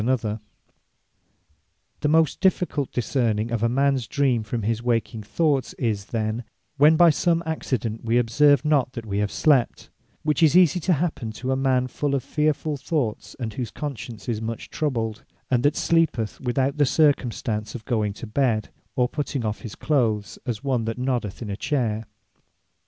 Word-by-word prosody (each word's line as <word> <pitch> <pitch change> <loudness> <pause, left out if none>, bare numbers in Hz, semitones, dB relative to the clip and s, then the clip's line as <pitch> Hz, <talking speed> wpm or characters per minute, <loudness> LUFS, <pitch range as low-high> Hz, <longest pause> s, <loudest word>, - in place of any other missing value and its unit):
Apparitions 125 0 +1
Or - - 0
Visions 105 +1 -4 1.6
The - - 0
most 160 -1 +3
difficult 180 -7 +1
discerning 115 -2 0
of 115 -2 -1
a 115 - +2
mans 135 -1 +1
Dream, 135 -5 +1
from 110 +1 -4
his 115 +2 0
waking 115 -2 -1
thoughts, 140 +5 0
is 105 -5 -2
then, 110 +1 -2 0.3
when 150 +3 +6
by 170 -1 +7
some 170 +2 +1
accident 125 -8 -2
we 115 +1 +2
observe 140 +4 +4
not 140 -4 +2
that 115 -2 -6
we 100 -1 -2
have 105 -1 0
slept: 140 -6 +1 0.3
which 150 +2 +1
is 160 +1 +6
easie 180 -1 +5
to 180 +2 +2
happen 150 -8 -2
to 130 +3 -3
a - - +2
man 130 -1 +2
full 140 +2 -1
of 135 - -1
fearfull 150 0 0
thoughts; 125 -8 -2
and 115 -4 -4
whose 120 -1 -4
conscience 120 -6 -7
is 115 -3 -2
much 115 0 -5
troubled; 115 -8 -2 0.3
and 125 -2 +3
that 145 +4 +2
sleepeth, 160 -10 +1
without 135 +2 0
the 145 - +4
circumstances, 120 -8 +1
of 115 - -8
going 110 -5 0
to 105 - -8
bed, 110 -2 0 0.3
or 125 -1 +2
putting 140 -3 -3
off 105 0 -3
his 115 -5 -7
clothes, 115 -8 0
as 120 0 -3
one 130 -5 0
that 115 +1 -3
noddeth 125 -5 -2
in 105 - -5
a - - -2
chayre. 115 -4 -1
125 Hz, 180 wpm, -24 LUFS, 110-145 Hz, 1.6 s, by